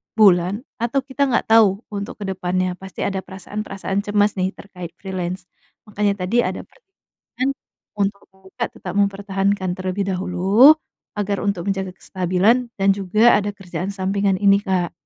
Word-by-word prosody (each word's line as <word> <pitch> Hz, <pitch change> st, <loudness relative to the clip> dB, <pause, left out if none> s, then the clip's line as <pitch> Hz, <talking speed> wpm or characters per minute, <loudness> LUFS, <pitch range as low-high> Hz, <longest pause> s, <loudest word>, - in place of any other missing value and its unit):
bulan, 195 Hz, 0 st, +4 dB, 0.2 s
atau 240 Hz, +4 st, +1 dB
kita 280 Hz, +1 st, 0 dB
enggak 235 Hz, -3 st, 0 dB
tahu, 215 Hz, -2 st, +5 dB
untuk 200 Hz, 0 st, -5 dB
ke -, -, -3 dB
depannya 185 Hz, 0 st, -1 dB
pasti 190 Hz, 0 st, -6 dB
ada 195 Hz, -1 st, -1 dB
perasaan-perasaan 195 Hz, +1 st, -5 dB
cemas 205 Hz, -1 st, +2 dB
nih, 185 Hz, +1 st, -1 dB
terkait 180 Hz, -4 st, -10 dB
freelance, 185 Hz, -1 st, -4 dB, 0.4 s
makanya, 205 Hz, -2 st, -1 dB
tadi 225 Hz, +7 st, +1 dB
ada -, -, -4 dB
pertimbangan 330 Hz, -, -7 dB, 0.5 s
untuk 200 Hz, 0 st, -1 dB
Kakak 190 Hz, 0 st, -6 dB
tetap 180 Hz, -1 st, -6 dB
mempertahankan 200 Hz, -1 st, 0 dB
terlebih 185 Hz, +1 st, -3 dB
dahulu, 195 Hz, -, +5 dB, 0.4 s
agar, 200 Hz, 0 st, -1 dB
untuk 200 Hz, -2 st, -1 dB
menjaga 190 Hz, -1 st, -1 dB
kestabilan, 190 Hz, +8 st, +1 dB
dan 195 Hz, -, +3 dB
juga, 210 Hz, +5 st, +4 dB
ada 205 Hz, 0 st, -2 dB
kerjaan 190 Hz, -2 st, -5 dB
sampingan 195 Hz, 0 st, 0 dB
ini, 200 Hz, 0 st, +5 dB
Kak. 185 Hz, -3 st, 0 dB
195 Hz, 145 wpm, -21 LUFS, 185-205 Hz, 0.5 s, tahu